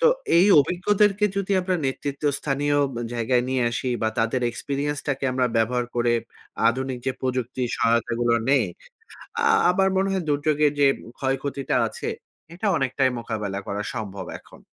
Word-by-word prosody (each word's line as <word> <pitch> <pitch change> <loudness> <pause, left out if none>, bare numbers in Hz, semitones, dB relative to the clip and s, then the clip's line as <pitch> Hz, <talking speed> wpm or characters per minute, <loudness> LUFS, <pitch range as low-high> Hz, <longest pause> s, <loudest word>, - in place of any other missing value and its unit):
তো - - +5 0.3
এই 180 +4 +6
অভিজ্ঞদেরকে 205 +5 +2
যদি 200 0 -1
আমরা 185 0 -1
নেতৃত্ব 140 +2 -4
স্থানীয় 145 0 0 0.4
জায়গায় 120 +1 +1
নিয়ে 130 -1 +1
আসি 125 +2 -2
বা 110 - +2
তাদের 115 +3 +1
এক্সপেরিয়েন্সটাকে 140 +2 -3
আমরা 125 0 +2
ব্যবহার 120 +2 +1
করে 120 0 +2 0.6
আধুনিক 130 +1 -2
যে 130 - +1
প্রযুক্তি 130 0 -2
সহায়তাগুলো 115 0 +1 0.2
নেই। 140 - +4 0.8
আ - - +1 0.3
আমার 190 +1 +2
মনে 195 +1 +1
হয় 190 -3 -1
দুর্যোগের 150 0 +2
যে 140 - +6 0.3
ক্ষয়ক্ষতিটা 135 +1 -2
আছে। 110 - -6 0.5
এটা 195 +5 -3
অনেকটাই 130 0 +1
মোকাবেলা 105 -4 -4
করা 100 +1 -2
সম্ভব 100 -5 -5
এখন। - - -18
135 Hz, 140 wpm, -24 LUFS, 120-150 Hz, 0.8 s, এই